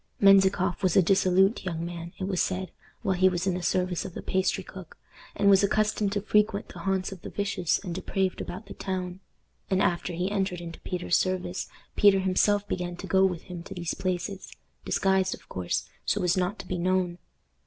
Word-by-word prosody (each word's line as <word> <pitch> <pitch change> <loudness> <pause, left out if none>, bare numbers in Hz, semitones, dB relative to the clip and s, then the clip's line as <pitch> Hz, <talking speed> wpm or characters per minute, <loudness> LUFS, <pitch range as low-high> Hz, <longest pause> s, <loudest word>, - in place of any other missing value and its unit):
Menzikoff 195 -2 +5
was 185 -4 +2
a 190 - +7
dissolute 190 +3 +3
young 170 -3 -3
man, 170 0 -6
it - - -5
was 185 -1 0
said, 185 0 -2 0.3
while 190 - +2
he 185 +1 +4
was 180 0 -2
in 190 - +1
the 180 - -3
service 180 0 0
of 180 - -8
the - - -6
pastry 190 0 0
cook, 185 -3 -11 0.4
and 200 - +2
was 195 -1 +7
accustomed 210 0 +1
to 205 - 0
frequent 210 0 +1
the 180 - -10
haunts 190 +1 -1
of 190 -3 -9
the - - -7
vicious 200 -4 0
and 180 -4 -6
depraved 190 +1 -1
about 190 +5 -6
the - - -9
town; 185 -1 -4 0.5
and 190 - +2
after 175 -1 0
he 180 +4 -2
entered 190 -3 -1
into 170 -1 -8
Peter's 180 -1 0
service, 185 -1 -2 0.3
Peter 200 -1 +6
himself 200 +2 +2
began 175 -1 -3
to 185 - -8
go 190 0 +3
with 180 -3 +1
him 180 -2 -7
to 195 +3 -9
these 170 -2 -2
places, 185 +1 -3 0.3
disguised, 190 -1 +2
of - - -21
course, 90 -1 -2 0.2
so 205 - 0
as 175 -1 +3
not 185 +3 0
to - - -8
be 180 -1 -2
known. 180 0 0
185 Hz, 205 wpm, -27 LUFS, 180-195 Hz, 0.5 s, a